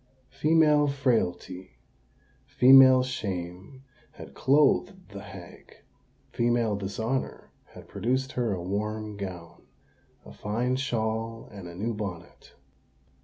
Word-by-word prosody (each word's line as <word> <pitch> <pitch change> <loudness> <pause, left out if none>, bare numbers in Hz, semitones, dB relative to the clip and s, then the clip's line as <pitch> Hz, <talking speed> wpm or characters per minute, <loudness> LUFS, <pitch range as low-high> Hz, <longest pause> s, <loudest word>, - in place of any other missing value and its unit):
Female 150 +1 +3
frailty—female 125 - +2
shame 95 0 -6 0.3
had - - -12
clothed 150 +7 +1
the 100 -1 -9
hag: 95 -3 -13 0.6
female 120 -2 +1
dishonour 110 +6 -4 0.2
had - - -12
produced 130 +3 -2
her 120 -5 -1
a 90 -3 -3
warm 105 +3 -4
gown, 90 -4 -8 0.6
a - - -12
fine 120 +5 -2
shawl, 115 -3 -3
and 100 -4 -10
a 85 - -10
new 110 +6 -3
bonnet. 95 -5 -8
110 Hz, 100 wpm, -27 LUFS, 95-130 Hz, 0.6 s, Female